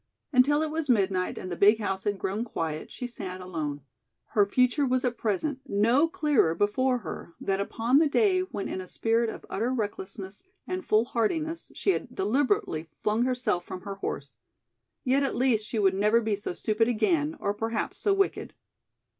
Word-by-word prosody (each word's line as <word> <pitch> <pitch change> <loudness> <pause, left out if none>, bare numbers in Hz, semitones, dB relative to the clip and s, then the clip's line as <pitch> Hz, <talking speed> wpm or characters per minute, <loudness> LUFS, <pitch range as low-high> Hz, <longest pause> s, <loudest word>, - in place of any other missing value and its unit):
Until 290 +4 +4
it 310 - -2
was 315 -2 -3
midnight 190 -5 +1
and 185 - -6
the - - -2
big 205 +5 +5
house 195 -2 -3
had 205 -1 0
grown 195 +4 -2
quiet 160 -9 -4
she 250 - -6
sat 190 -6 -6
alone. 155 -6 -4 0.5
Her 205 -2 +3
future 250 +6 +2
was 255 -1 +1
at 245 -1 0
present 255 +7 -1
no 230 +10 +3
clearer 300 - +2
before 250 +7 +2
her 165 - -7
than 195 0 -1
upon 230 +6 +2
the 310 -2 +3
day 380 +3 +3
when 290 - -3
in 185 - -4
a 185 - -9
spirit 230 +4 +1
of - - -8
utter 230 +5 -1
recklessness 205 -4 -4 0.2
and 370 0 -3
foolhardiness 265 +9 0
she 390 - +2
had 250 -9 -4
deliberately 205 - 0
flung 215 +3 +2
herself 250 -8 0
from 185 - -7
her 200 - -5
horse. 140 -8 -5 0.7
Yet 265 +2 +3
at 275 - 0
least 235 -4 +2
she 230 - -3
would 195 -3 +3
never 210 +4 +3
be 220 -2 0
so 200 -2 -5
stupid 215 +5 +1
again 300 - +1
or 200 - 0
perhaps 225 +1 -3
so 410 - +2
wicked! 395 0 0
225 Hz, 180 wpm, -27 LUFS, 195-265 Hz, 0.7 s, big